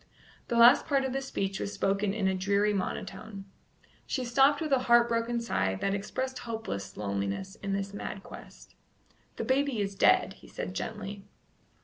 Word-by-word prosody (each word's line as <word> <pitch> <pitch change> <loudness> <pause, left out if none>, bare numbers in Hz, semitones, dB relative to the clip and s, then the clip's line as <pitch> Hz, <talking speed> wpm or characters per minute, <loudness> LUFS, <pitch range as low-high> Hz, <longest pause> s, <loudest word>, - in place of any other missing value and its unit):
The 235 - 0
last 240 +3 +7
part 275 -3 +2
of 260 - -2
the 270 - -1
speech 195 -7 -3
was 200 - -3
spoken 195 +1 0
in 200 -2 0
a 190 - +2
dreary 200 +2 +1
monotone. 200 +1 -4 0.6
She 260 -3 -2
stopped 270 +4 +4
with 310 -2 -3
a 265 - +5
heart 235 0 +7
broken 235 0 0
sigh 95 - 0
that 195 - -1
expressed 260 +6 -3
hopeless 160 - -5
loneliness 100 - -3
in 195 -1 -3
this 195 0 -3
mad 200 -1 -6
quest. - - -13 0.6
"The - - -3
baby 270 -2 +1
is 200 -1 -1
dead," 195 - +4
he - - -17
said 90 - -5
gently. 200 - -5
205 Hz, 170 wpm, -29 LUFS, 195-240 Hz, 0.6 s, last